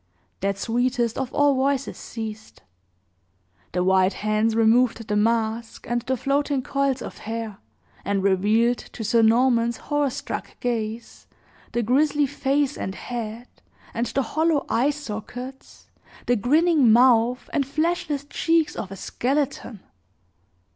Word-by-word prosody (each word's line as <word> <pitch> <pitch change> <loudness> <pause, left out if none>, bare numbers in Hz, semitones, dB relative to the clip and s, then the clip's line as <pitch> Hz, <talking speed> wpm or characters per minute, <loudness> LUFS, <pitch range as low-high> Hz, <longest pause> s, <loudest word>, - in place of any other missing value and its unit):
That 195 0 -1
sweetest 240 +2 0
of 265 -1 -3
all 290 -1 +3
voices 275 +1 0
ceased. 220 - -8 1.1
The 180 +1 0
white 190 +1 +3
hands 215 +1 0
removed 230 0 +3
the 210 - -1
mask, 225 +1 0
and 240 +1 0
the 260 +2 -2
floating 275 +1 0
coils 275 -2 0
of - - -8
hair, 225 -2 -5 0.4
and 200 -1 -1
revealed, 215 +5 +2
to 225 - -8
Sir 230 +2 +3
Norman's 235 0 +3
horror 290 -1 0
struck - - -6
gaze, 230 -1 -4 0.5
the 240 - 0
grisly 290 +5 +2
face 280 +1 0
and 190 - -4
head, 235 0 -6 0.5
and 235 +1 -1
the 275 - 0
hollow 315 +3 +1
eye 255 +5 +2
sockets, 255 -1 -7 0.3
the 245 - +3
grinning 290 - +4
mouth, 240 +1 +4
and 290 - +2
fleshless 310 -1 -1
cheeks 330 +2 +1
of 195 - -5
a - - -6
skeleton! 255 -1 -2
240 Hz, 130 wpm, -24 LUFS, 220-275 Hz, 1.1 s, grinning